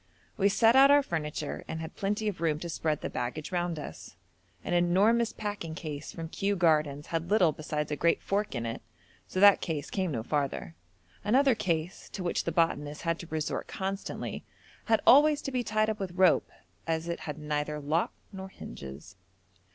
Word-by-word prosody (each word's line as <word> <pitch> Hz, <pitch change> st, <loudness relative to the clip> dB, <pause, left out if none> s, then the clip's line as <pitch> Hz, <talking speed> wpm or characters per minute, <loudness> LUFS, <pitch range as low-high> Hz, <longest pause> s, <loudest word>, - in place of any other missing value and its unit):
We 200 Hz, 0 st, +3 dB
set 225 Hz, +4 st, +4 dB
out 270 Hz, +1 st, +8 dB
our 285 Hz, 0 st, +6 dB
furniture 150 Hz, -, -4 dB
and 160 Hz, -, -4 dB
had 160 Hz, 0 st, -7 dB
plenty 210 Hz, +2 st, -1 dB
of 195 Hz, -5 st, -3 dB
room 160 Hz, -3 st, +1 dB
to 170 Hz, -, -5 dB
spread 155 Hz, -2 st, -1 dB
the -, -, -2 dB
baggage 125 Hz, +5 st, -4 dB
round 175 Hz, -2 st, -1 dB
us. 145 Hz, -, -8 dB, 0.5 s
An -, -, -3 dB
enormous 200 Hz, +7 st, +3 dB
packing 205 Hz, -7 st, -5 dB
case 155 Hz, -4 st, -6 dB
from 165 Hz, -1 st, -6 dB
Kew 200 Hz, +4 st, -1 dB
Gardens 155 Hz, -4 st, +2 dB
had 165 Hz, +1 st, -1 dB
little 190 Hz, -6 st, +4 dB
besides 150 Hz, 0 st, -4 dB
a -, -, +1 dB
great 170 Hz, +3 st, +2 dB
fork 205 Hz, -5 st, -1 dB
in 120 Hz, -1 st, -2 dB
it, 115 Hz, -, -4 dB, 0.5 s
so 185 Hz, -, -3 dB
that 200 Hz, 0 st, +7 dB
case 155 Hz, -4 st, -3 dB
came 190 Hz, -3 st, -1 dB
no 115 Hz, -5 st, -2 dB
farther. 140 Hz, -, -2 dB, 0.5 s
Another 265 Hz, +5 st, +4 dB
case, 175 Hz, -5 st, -2 dB
to 190 Hz, -, -4 dB
which 175 Hz, -, -1 dB
the 170 Hz, -, 0 dB
botanist 150 Hz, -3 st, 0 dB
had 165 Hz, 0 st, 0 dB
to 170 Hz, -, -8 dB
resort 155 Hz, -2 st, -3 dB
constantly, 195 Hz, +1 st, -4 dB, 0.4 s
had 225 Hz, -2 st, +3 dB
always 295 Hz, +2 st, +7 dB
to 275 Hz, -, -3 dB
be 250 Hz, -1 st, 0 dB
tied 215 Hz, -1 st, +1 dB
up 220 Hz, -1 st, -2 dB
with 190 Hz, -3 st, -4 dB
rope, 185 Hz, -1 st, +4 dB, 0.4 s
as 165 Hz, 0 st, -1 dB
it 170 Hz, -, -3 dB
had 150 Hz, -2 st, -6 dB
neither 150 Hz, 0 st, -2 dB
lock 155 Hz, +4 st, 0 dB, 0.2 s
nor 190 Hz, 0 st, -7 dB
hinges. 70 Hz, -, -10 dB
170 Hz, 190 wpm, -29 LUFS, 150-200 Hz, 0.5 s, out